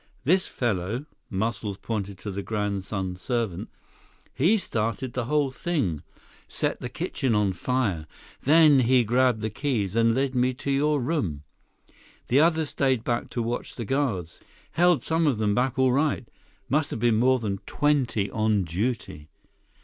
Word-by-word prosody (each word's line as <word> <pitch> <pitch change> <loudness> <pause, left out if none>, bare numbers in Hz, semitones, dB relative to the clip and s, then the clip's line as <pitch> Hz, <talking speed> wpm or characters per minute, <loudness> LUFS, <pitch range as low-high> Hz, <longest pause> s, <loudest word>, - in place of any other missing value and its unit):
This 185 +7 +2
fellow," 115 +2 -2 0.2
Muscles 105 0 -2
pointed 100 -4 -4
to 100 +2 -6
the 100 +1 -4
grandson 100 -3 -3
servant, 110 -1 -2 0.6
"he 170 +12 +3
started 115 - -2
the 125 -2 -2
whole 145 +1 +1
thing. 130 - -1 0.5
Set - - -2
the 125 - -5
kitchen 135 -5 -1
on 105 -2 +2
fire. 100 -7 -1 0.3
Then 150 -1 +6
he 125 0 +4
grabbed 120 0 +2
the 110 0 -2
keys, 110 -6 -1
and 115 0 +3
led 135 0 0
me 125 0 +1
to 140 +2 -3
your 145 +2 +2
room. 120 - -2 0.9
The 130 - +4
others 160 -1 +3
stayed 130 -4 +1
back 120 0 -1
to 120 - -2
watch 120 +2 -4
the 120 - -5
guards. 105 - -1 0.3
Held 175 -1 +3
some 165 0 +1
of 135 -6 +2
them 105 -1 +1
back 125 +3 0
all 130 -1 +4
right. 140 -2 0 0.4
Must 150 +1 +1
have - - -4
been 115 -1 +3
more 130 +3 +4
than 100 -5 -3
twenty 135 -9 +1
on 110 -2 +1
duty." 95 -3 -3
120 Hz, 155 wpm, -26 LUFS, 105-135 Hz, 0.9 s, Then